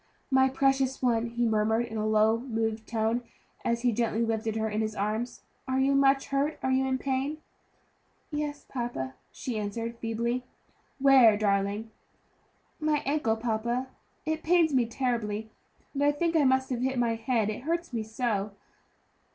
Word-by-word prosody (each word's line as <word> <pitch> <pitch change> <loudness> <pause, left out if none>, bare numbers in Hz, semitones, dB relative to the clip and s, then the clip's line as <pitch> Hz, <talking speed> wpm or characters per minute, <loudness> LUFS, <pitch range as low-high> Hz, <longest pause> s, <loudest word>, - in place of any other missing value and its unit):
"My 265 0 +5
precious 270 0 +1
one," 235 -2 +2
he 235 +1 -1
murmured 220 +1 +2
in 225 -1 -8
a 215 0 -1
low, 215 +1 +3
moved 225 -3 -2
tone, 225 +1 0 0.4
as 235 0 0
he 245 - +4
gently 230 0 0
lifted 220 -1 -1
her 220 0 0
in 215 0 -1
his 215 0 -2
arms; 215 +4 -2 0.2
"are 260 0 +1
you 270 +1 +3
much 275 0 +3
hurt? 280 +2 0
Are 260 - +1
you 265 0 +2
in 260 0 +1
pain?" 270 +3 -1 0.9
"Yes, 295 -1 -3
papa," 235 - -4 0.2
she 235 -4 -4
answered 230 +3 -4
feebly. 235 +2 -1 0.5
"Where, 265 -6 +6
darling?" 205 +1 0 0.9
"My 305 -2 +1
ankle, 275 -6 +1
papa; 235 +3 -1 0.4
it 315 0 -1
pains 330 -2 +3
me 250 -3 +3
terribly; 220 -3 -2 0.4
and 285 0 0
I 290 - +5
think 330 +3 -1
I 305 -3 +4
must 260 0 +2
have 245 -1 -1
hit 265 0 0
my 235 -1 +2
head, 225 -2 0
it 210 - -6
hurts 335 -2 -2
me 230 - -1
so." 220 -2 -2
235 Hz, 165 wpm, -28 LUFS, 220-270 Hz, 0.9 s, Where